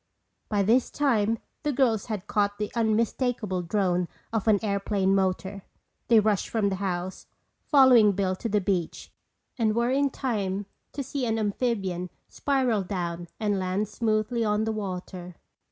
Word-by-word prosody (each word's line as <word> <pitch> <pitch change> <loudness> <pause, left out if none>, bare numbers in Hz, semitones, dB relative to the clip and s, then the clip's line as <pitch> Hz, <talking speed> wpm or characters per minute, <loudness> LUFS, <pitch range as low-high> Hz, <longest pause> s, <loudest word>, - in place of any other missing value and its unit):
By 205 -2 +1
this 235 +5 +3
time 230 -6 +1 0.2
the 295 - 0
girls 240 -6 +1
had 210 -4 -4
caught 205 -1 0
the 210 0 -3
unmistakable 225 -3 0
drone 180 -1 0 0.3
of 225 -1 -1
an 215 -2 +5
airplane 200 -1 +1
motor. 190 +1 -1 0.5
They 230 -2 +6
rushed 210 -2 +1
from 215 -3 +1
the 190 - -2
house, 185 -1 -4 0.4
following 250 -7 +6
Bill 190 -1 0
to 230 - -3
the 210 0 +2
beach, 180 -3 -2 0.5
and 220 -2 +2
were 235 +1 +1
in 280 +1 +2
time 205 -7 -2 0.3
to 280 - -3
see 265 -1 -3
an 225 0 0
amphibian 200 -5 -1 0.2
spiral 260 -7 +1
down 175 -2 -4
and 205 -3 0
land 185 +3 -1
smoothly 220 +1 0
on 210 0 +1
the 220 - -1
water. 185 -3 -6
210 Hz, 155 wpm, -26 LUFS, 190-230 Hz, 0.5 s, They